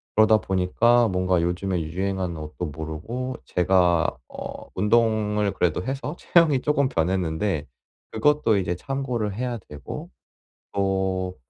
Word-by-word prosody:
그러다 110 0 +6
보니까 110 +6 +3
뭔가 90 -2 +1
요즘에 90 +2 -1
유행하는 90 +2 -2
옷도 75 +3 -5
모르고 80 - -5
제가 90 -2 +3 0.2
어 - - -8
운동을 105 0 +2
그래도 90 -1 0
해서 135 - -4
체형이 160 -6 +4
쪼금 140 -2 +2
변했는데 85 - 0 0.5
그것도 115 -1 +3
이제 90 -2 -1
참고를 125 -2 -3
해야 125 0 -2
되고 75 -2 -7 0.6
또 95 -2 -1
95 Hz, 275 characters per minute, -24 LUFS, 90-120 Hz, 0.6 s, 그러다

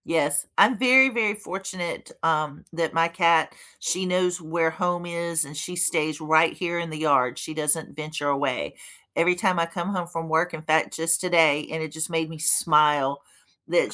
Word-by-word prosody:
Yes. 150 -3 +1
I'm 255 - +5
very, 260 +1 +6
very 225 -4 0
fortunate, 190 -4 -6
um, 155 -3 -1
that 165 -1 -2
my 165 0 +2
cat 170 -2 +2 0.3
she 185 +1 -1
knows 180 0 0
where 160 0 -1
home 175 0 -2
is, 170 -2 -2
and 145 +2 -12
she 180 +4 -5
stays 155 -4 0
right 160 +1 +3
here 175 -1 -3
in 170 -1 -5
the 155 - -7
yard. 140 -5 +1
She 155 - -6
doesn't 155 0 -1
venture 155 -1 -5
away. 135 - -2 0.4
Every 180 +2 +2
time 185 -2 0
I 165 - +2
come 175 +2 -5
home 180 -4 -3
from 165 -1 -6
work, 160 +2 0
in 160 -1 -7
fact 160 0 +1
just 165 +1 +2
today, 160 -5 +3
and 160 0 -3
it 160 - -7
just 160 +2 -3
made 160 -1 -2
me 160 -1 -10
smile 150 -3 +3 0.5
that - - +1
165 Hz, 190 wpm, -24 LUFS, 155-175 Hz, 0.5 s, very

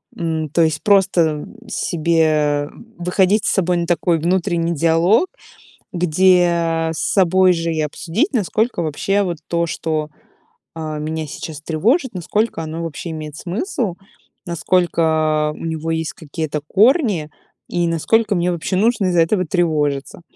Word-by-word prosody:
м, 160 -2 -2
то 170 - +1
есть 160 -1 +1
просто 175 -7 +3 0.2
себе, 155 -6 +1
м, 230 0 -17
выходить 190 +4 +2
с - - +2
собой 180 -2 +1
на 170 - -1
такой 175 -1 +1
внутренний 170 0 0
диалог, 170 - +3 0.7
где 170 -2 +2
с 160 - -7
собой 185 -1 +3
же 165 -1 -2
и 155 - -1
обсудить, 165 - -1
насколько 220 -1 0
вообще 195 +7 0
вот 175 -3 -3
то, 170 0 0
что, 155 -2 -2 0.7
а, 155 -2 -5
меня 155 +1 -3
сейчас 150 +1 -7
тревожит, 230 - 0
насколько 185 +1 -1
оно 160 +1 -5
вообще 165 +1 -6
имеет 155 -2 -6
смысл, 215 - -3 0.5
насколько 160 -3 +1
у - - -9
него 160 0 -3
есть 160 +3 -2
какие-то 155 -2 -4
корни 210 - +3 0.4
и 175 -1 0
насколько 210 +6 +1
мне 175 0 +1
вообще 170 +2 -3
нужно 215 0 +2
из-за 175 -2 +3
этого 185 +3 +2
тревожиться. 150 -3 -1
170 Hz, 140 wpm, -19 LUFS, 160-185 Hz, 0.7 s, просто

